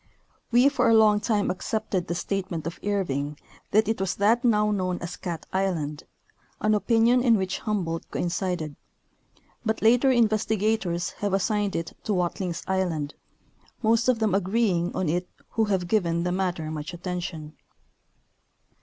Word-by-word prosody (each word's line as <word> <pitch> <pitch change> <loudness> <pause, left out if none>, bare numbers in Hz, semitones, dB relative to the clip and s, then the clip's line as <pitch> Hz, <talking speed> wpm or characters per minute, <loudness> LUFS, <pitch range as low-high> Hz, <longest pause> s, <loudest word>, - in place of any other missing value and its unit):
We 245 +3 +6
for 255 -4 +2
a 225 - +6
long 215 -1 +5
time 205 -1 +1
accepted 195 -1 -2
the 170 - -2
statement 180 -3 -3
of 165 - -5
Irving 150 -8 -1 0.3
that 215 +2 +3
it 220 -3 -1
was 190 -2 -1
that 225 +5 +3
now 210 -3 +3
known 185 -3 -1
as 175 +1 -6
Cat 170 -4 -5
island, 165 -6 -1 0.5
an 215 0 +2
opinion 230 +3 +3
in 235 -3 +4
which 190 -1 -2
Hum 210 -4 -1
boldt 165 0 -4
coincided; 175 -4 -2 0.9
but 220 -2 -1
later 245 +4 +5
investigators 215 -6 +1
have 200 -2 0
assigned 205 0 0
it 165 -1 -4
to 210 - 0
Watlings 180 0 -2
island, 175 -6 -1 0.7
most 230 +2 +3
of 250 - +3
them 220 -3 +1
agreeing 190 -2 +1
on 185 - 0
it 175 +3 -1 0.2
who 225 - +1
have 190 -4 0
given 170 -4 +1
the 180 - 0
matter 180 -4 -2
much 155 +2 -5
attention. 175 -3 -5
190 Hz, 155 wpm, -26 LUFS, 175-220 Hz, 0.9 s, We